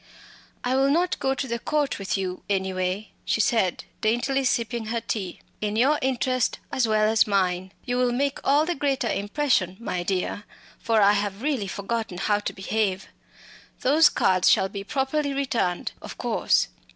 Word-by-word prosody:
"I 250 Hz, +1 st, +1 dB
will 270 Hz, +1 st, +3 dB
not 345 Hz, +5 st, +1 dB
go 270 Hz, 0 st, 0 dB
to 265 Hz, -, -3 dB
the 235 Hz, -1 st, -2 dB
Court 290 Hz, -2 st, -1 dB
with 195 Hz, 0 st, -1 dB
you 185 Hz, -1 st, -3 dB
anyway," 190 Hz, +1 st, -1 dB
she -, -, 0 dB
said, 210 Hz, -4 st, +1 dB, 0.2 s
daintily 245 Hz, +5 st, +1 dB
sipping 235 Hz, -2 st, 0 dB
her 230 Hz, +1 st, -1 dB
tea 210 Hz, -5 st, -4 dB, 0.2 s
"in 210 Hz, 0 st, -1 dB
your 275 Hz, +7 st, +3 dB
interests 255 Hz, -1 st, 0 dB
as 250 Hz, -3 st, +1 dB
well 215 Hz, -1 st, +3 dB
as 220 Hz, 0 st, +3 dB
mine. 185 Hz, -2 st, 0 dB
You 245 Hz, -1 st, -1 dB
will 250 Hz, -1 st, +2 dB
make 275 Hz, +3 st, 0 dB
all 290 Hz, +3 st, +3 dB
the 350 Hz, -, 0 dB
greater 275 Hz, -4 st, 0 dB
impression, 205 Hz, -, 0 dB
my 180 Hz, -6 st, -3 dB
dear, 190 Hz, +3 st, -2 dB, 0.3 s
for 225 Hz, -2 st, +2 dB
I 200 Hz, -, +6 dB
have 205 Hz, +1 st, -2 dB
really 275 Hz, -9 st, 0 dB
forgotten 200 Hz, 0 st, -3 dB
how 205 Hz, +3 st, +1 dB
to 210 Hz, -, -3 dB
behave. 195 Hz, -1 st, -2 dB, 0.7 s
Those 300 Hz, +5 st, +5 dB
cards 185 Hz, -1 st, +3 dB
shall 190 Hz, -, +4 dB
be 200 Hz, 0 st, -6 dB
properly 280 Hz, +4 st, -1 dB
returned, 235 Hz, -10 st, -1 dB
of -, -, -9 dB
course. -, -, +1 dB
225 Hz, 170 wpm, -25 LUFS, 195-265 Hz, 0.7 s, I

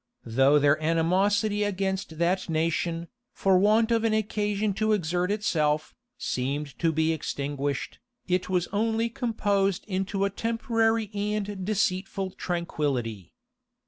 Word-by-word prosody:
Though 135 Hz, +5 st, +4 dB
their 145 Hz, +1 st, +3 dB
animosity 195 Hz, +6 st, +2 dB
against 190 Hz, -4 st, -2 dB
that 175 Hz, +2 st, 0 dB
nation, 165 Hz, +1 st, -1 dB, 0.3 s
for 190 Hz, -1 st, +3 dB
want 220 Hz, +3 st, +4 dB
of 230 Hz, -1 st, +2 dB
an 225 Hz, -1 st, +2 dB
occasion 210 Hz, -1 st, 0 dB
to 215 Hz, 0 st, +3 dB
exert 180 Hz, -1 st, 0 dB
itself, 155 Hz, -8 st, 0 dB, 0.2 s
seemed 140 Hz, +2 st, -3 dB
to 165 Hz, -, +2 dB
be 160 Hz, +1 st, +1 dB
extinguished, 145 Hz, -2 st, -3 dB, 0.3 s
it 180 Hz, 0 st, 0 dB
was 180 Hz, -2 st, +1 dB
only 225 Hz, +2 st, +1 dB
composed 205 Hz, -5 st, 0 dB
into 195 Hz, 0 st, -1 dB
a 200 Hz, -, -1 dB
temporary 225 Hz, -1 st, 0 dB
and 205 Hz, -1 st, -2 dB
deceitful 195 Hz, -1 st, -1 dB
tranquillity. 140 Hz, -, -3 dB
190 Hz, 120 wpm, -27 LUFS, 160-210 Hz, 0.3 s, Though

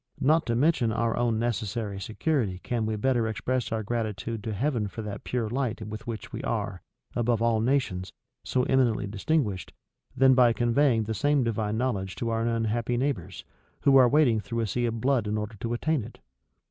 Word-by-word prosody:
Not 155 Hz, +4 st, +3 dB
to 115 Hz, -, +1 dB
mention 130 Hz, -3 st, +2 dB
our 115 Hz, 0 st, 0 dB
own 120 Hz, -2 st, +1 dB
necessary 110 Hz, -3 st, -2 dB
security 110 Hz, -, -1 dB
can 115 Hz, -3 st, -1 dB
we 110 Hz, -, -1 dB
better 120 Hz, 0 st, +1 dB
express 120 Hz, +3 st, -2 dB
our 110 Hz, -1 st, -1 dB
gratitude 110 Hz, -1 st, -3 dB
to 110 Hz, -, -3 dB
Heaven 115 Hz, 0 st, 0 dB
for 110 Hz, +3 st, -7 dB
that 105 Hz, -1 st, -6 dB
pure 120 Hz, -3 st, -1 dB
light 120 Hz, -2 st, -2 dB
with 110 Hz, +1 st, -7 dB
which 115 Hz, -2 st, -6 dB
we -, -, -4 dB
are, -, -, -3 dB, 0.3 s
above 120 Hz, -1 st, +1 dB
all 115 Hz, -1 st, +2 dB
nations, 115 Hz, -8 st, 0 dB, 0.3 s
so 125 Hz, -, 0 dB
eminently 125 Hz, -5 st, +2 dB
distinguished, 100 Hz, -, -1 dB, 0.4 s
than 130 Hz, 0 st, +6 dB
by 125 Hz, -2 st, +5 dB
conveying 120 Hz, 0 st, +2 dB
the 110 Hz, +1 st, -3 dB
same 145 Hz, +5 st, +2 dB
divine 110 Hz, -2 st, -1 dB
knowledge 100 Hz, -7 st, -1 dB
to 115 Hz, -, -2 dB
our 115 Hz, 0 st, 0 dB
unhappy 115 Hz, +1 st, 0 dB
neighbors, 125 Hz, -, -3 dB, 0.4 s
who 140 Hz, -, +5 dB
are 130 Hz, -2 st, +7 dB
wading 130 Hz, -6 st, +4 dB
through 115 Hz, +2 st, -3 dB
a -, -, 0 dB
sea 120 Hz, +4 st, 0 dB
of 115 Hz, -1 st, -3 dB
blood 130 Hz, -5 st, +2 dB
in 105 Hz, +1 st, -1 dB
order 105 Hz, +1 st, -4 dB
to 115 Hz, +3 st, -3 dB
attain 150 Hz, +2 st, 0 dB
it? 120 Hz, -, -11 dB
115 Hz, 190 wpm, -27 LUFS, 110-125 Hz, 0.4 s, are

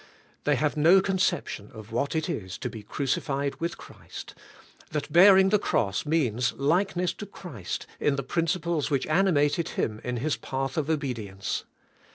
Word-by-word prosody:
They 145 Hz, -, +3 dB
have 150 Hz, +3 st, 0 dB
no 165 Hz, +6 st, +6 dB
con 190 Hz, 0 st, 0 dB
ception 105 Hz, -, -1 dB
of 110 Hz, 0 st, -10 dB
what 140 Hz, +7 st, -1 dB
it 160 Hz, 0 st, 0 dB
is 105 Hz, -, -4 dB
to -, -, -4 dB
be 110 Hz, -, -8 dB
crucified 140 Hz, +5 st, -2 dB
with 170 Hz, +1 st, -2 dB
Christ, -, -, -10 dB, 0.6 s
that 150 Hz, -2 st, -4 dB
bearing 190 Hz, +2 st, +8 dB
the 210 Hz, +1 st, +4 dB
cross 100 Hz, -, 0 dB
means 125 Hz, -7 st, +1 dB
likeness 175 Hz, +5 st, +1 dB
to 205 Hz, -, -8 dB
Christ 135 Hz, -, -6 dB
in 145 Hz, -, +2 dB
the 135 Hz, -, -2 dB
principles 165 Hz, +1 st, 0 dB
which 140 Hz, -3 st, +1 dB
animated 160 Hz, -2 st, +2 dB
Him 110 Hz, 0 st, -1 dB
in 125 Hz, 0 st, -2 dB
His 145 Hz, +5 st, -1 dB
path 135 Hz, 0 st, -3 dB
of 155 Hz, -3 st, -1 dB
obedi 135 Hz, -9 st, -2 dB
ence. 95 Hz, 0 st, -3 dB
145 Hz, 170 wpm, -27 LUFS, 125-170 Hz, 0.6 s, bearing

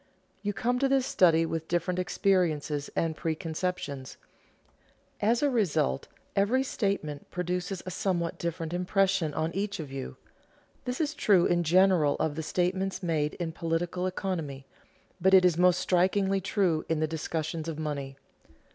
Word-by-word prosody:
You 205 Hz, 0 st, -1 dB
come 245 Hz, +5 st, 0 dB
to 275 Hz, 0 st, +2 dB
this 270 Hz, -1 st, +3 dB
study 165 Hz, -8 st, +4 dB
with 165 Hz, 0 st, -3 dB
different 175 Hz, +1 st, 0 dB
experiences 165 Hz, -6 st, 0 dB
and 165 Hz, -1 st, 0 dB
preconceptions; 160 Hz, -4 st, -3 dB, 1.0 s
as 230 Hz, +6 st, +2 dB
a 290 Hz, -, +4 dB
result 180 Hz, -, +1 dB, 0.3 s
every 225 Hz, +7 st, +3 dB
statement 195 Hz, -, -2 dB
produces 180 Hz, +1 st, -3 dB
a 185 Hz, -, -4 dB
somewhat 175 Hz, -2 st, -1 dB
different 170 Hz, -1 st, -3 dB
impression 185 Hz, -2 st, +1 dB
on 160 Hz, +1 st, -1 dB
each 200 Hz, 0 st, -2 dB
of 150 Hz, -4 st, -6 dB
you. 135 Hz, -, -6 dB, 0.7 s
This 250 Hz, 0 st, -3 dB
is 305 Hz, -1 st, 0 dB
true 195 Hz, -, +4 dB
in 175 Hz, 0 st, +2 dB
general 175 Hz, -3 st, +4 dB
of 155 Hz, -, -1 dB
the 160 Hz, -, -4 dB
statements 185 Hz, +3 st, -1 dB
made 155 Hz, -3 st, 0 dB
in 170 Hz, -2 st, -3 dB
political 170 Hz, +2 st, -2 dB
economy; 165 Hz, -8 st, -4 dB, 0.6 s
but 190 Hz, 0 st, +6 dB
it 185 Hz, -1 st, +7 dB
is 180 Hz, -3 st, +4 dB
most 180 Hz, +1 st, +4 dB
strikingly 190 Hz, +2 st, +2 dB
true 180 Hz, -5 st, +1 dB
in 160 Hz, -1 st, +1 dB
the 155 Hz, -, +2 dB
discussions 160 Hz, 0 st, -3 dB
of 160 Hz, -2 st, -4 dB
money. 140 Hz, -3 st, -4 dB
175 Hz, 150 wpm, -28 LUFS, 160-195 Hz, 1.0 s, it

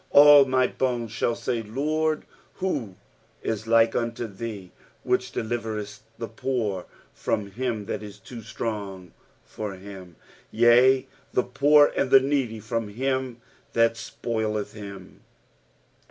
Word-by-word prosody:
10 -, -, +8 dB
AH 145 Hz, -1 st, +10 dB
my 130 Hz, -1 st, +3 dB
bones 120 Hz, -4 st, -1 dB
shall 115 Hz, +1 st, 0 dB
say, 120 Hz, -2 st, -2 dB
LORD, 155 Hz, +7 st, -1 dB, 0.3 s
who 120 Hz, -, -3 dB, 0.5 s
if 110 Hz, 0 st, -3 dB
like 115 Hz, 0 st, +4 dB
unto 115 Hz, 0 st, -2 dB
thee, 100 Hz, -3 st, -7 dB, 0.3 s
which 125 Hz, 0 st, 0 dB
deliverest 110 Hz, -2 st, -4 dB, 0.2 s
the 115 Hz, -, -4 dB
poor 110 Hz, -5 st, -2 dB, 0.3 s
from 100 Hz, -1 st, -2 dB
him 115 Hz, -1 st, -3 dB
that -, -, -4 dB
is 105 Hz, -2 st, -9 dB
too 120 Hz, -2 st, -10 dB
strong 100 Hz, -5 st, -5 dB, 0.3 s
for 105 Hz, -3 st, -6 dB
him, 95 Hz, -2 st, -11 dB, 0.3 s
yea, 125 Hz, +3 st, +5 dB, 0.3 s
the 125 Hz, -, +2 dB
poor 145 Hz, +3 st, +5 dB
and 135 Hz, -, +1 dB
the 135 Hz, -, +8 dB
needy 130 Hz, -5 st, -1 dB
from 115 Hz, +1 st, -3 dB
him 130 Hz, +2 st, -2 dB, 0.3 s
that 115 Hz, 0 st, +4 dB
spoileth 110 Hz, -2 st, -3 dB
him? 100 Hz, -3 st, -10 dB
115 Hz, 130 wpm, -25 LUFS, 105-130 Hz, 0.5 s, AH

